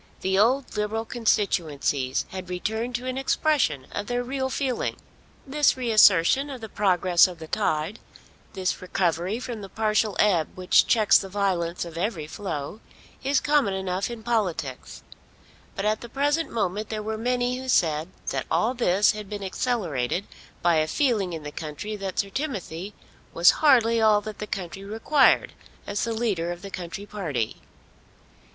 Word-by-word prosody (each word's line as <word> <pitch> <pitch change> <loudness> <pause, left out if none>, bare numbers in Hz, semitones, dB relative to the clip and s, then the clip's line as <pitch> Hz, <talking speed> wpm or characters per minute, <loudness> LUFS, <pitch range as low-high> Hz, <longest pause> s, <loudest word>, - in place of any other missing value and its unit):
The 190 +1 +1
old 255 +5 +2
Liberal 215 +2 -1
constituencies 155 - 0
had 185 -1 -7
returned 220 +7 -3
to 245 +2 -3
an 255 +1 -2
expression 270 - +1
of 205 - -4
their 245 0 -1
real 265 +1 -2
feeling. 260 -2 -1 0.5
This 285 0 +2
reassertion 225 - +5
of 265 -3 -6
the 220 -1 -8
progress 185 -3 +4
of 180 -2 -9
the 160 - -8
tide, 155 +7 -1 0.5
this 185 -1 -2
recovery 180 +2 -1
from 240 -4 -6
the 195 - -8
partial 215 -1 +1
ebb 180 -7 +2
which 185 -1 +4
checks 215 -3 +5
the 195 - -6
violence 180 -4 -1
of 165 -1 -7
every 180 -5 -2
flow, 155 +1 -5 0.4
is 275 +1 +2
common 285 -10 +2
enough 190 +1 -2
in 235 -2 -7
politics; 185 - -2 0.7
but 195 - -3
at 215 0 +1
the 235 - -9
present 290 +5 0
moment 210 -1 -2
there 215 -1 -3
were 220 +1 -3
many 245 +2 0
who 260 0 -6
said 160 -7 +2 0.2
that - - -3
all 230 +3 +2
this 205 -5 +3
had 210 -2 -7
been 205 -1 -5
accelerated 190 - -1 0.4
by 170 -2 +4
a 155 0 +2
feeling 215 - +1
in 160 -2 -6
the 150 - -6
country 160 +8 -6
that 195 -2 -5
Sir 200 - 0
Timothy 200 - -4 0.4
was 170 +1 +7
hardly 230 -6 +5
all 215 -1 +5
that 215 0 -8
the 210 - -5
country 195 -1 -5
required 225 +8 +3 0.3
as 205 0 -2
the 230 - -2
leader 205 -7 -1
of 175 +2 -7
the 195 - -8
country 180 +3 -6
party. 155 - -3
205 Hz, 165 wpm, -25 LUFS, 180-235 Hz, 0.7 s, was